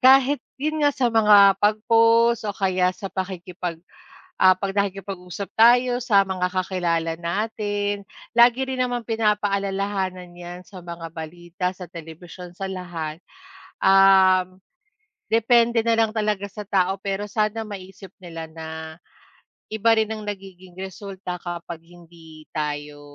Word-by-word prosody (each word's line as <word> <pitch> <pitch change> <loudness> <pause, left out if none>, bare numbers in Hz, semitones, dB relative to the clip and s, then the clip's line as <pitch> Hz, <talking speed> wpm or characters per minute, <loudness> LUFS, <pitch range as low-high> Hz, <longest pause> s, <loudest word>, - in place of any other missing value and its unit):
Kahit 270 +2 +5 0.2
'yun 310 +3 -2
nga, 290 - +5
sa 250 -4 0
mga 205 -3 +7
pag-post 230 +2 +3
o 200 - -3
kaya 185 -2 +2
sa 195 - -7
pakikipag 180 -2 -5 0.6
ah, 185 0 +7
'pag 195 +1 -3
nakikipag-usap 195 -2 -4
tayo 245 +2 +5
sa 210 -5 +4
mga 185 -1 -1
kakilala 175 -3 -1
natin 205 +2 -2 0.3
lagi 240 +2 +5
rin 260 -1 -4
namang 245 -2 -1
pinapaalalahanan 200 -4 -1
'yan, 175 0 -9
sa 190 - -12
mga 170 -1 -8
balita, 175 +3 -6
sa 180 - -8
telebisyon, 175 +1 -10
sa 195 - -4
lahat. 170 -4 -5 0.6
Um, 190 -1 +5 0.7
depende 230 +1 +4
na 230 0 +2
lang 225 -1 +2
talaga 210 -2 -1
sa 210 - -7
tao 190 -1 +1
pero 195 +1 -2
sana 215 +1 -1
maisip 195 -2 -10
nila 165 -3 -7
na 160 0 -8 1.1
iba 225 +1 +3
rin 220 0 +1
ang 215 -1 -6
nagiging 190 -3 -9
resulta 190 -1 -7
kapag 170 -1 -6
hindi 165 -2 -16
tayo, 150 -1 -4
195 Hz, 130 wpm, -23 LUFS, 180-215 Hz, 1.1 s, mga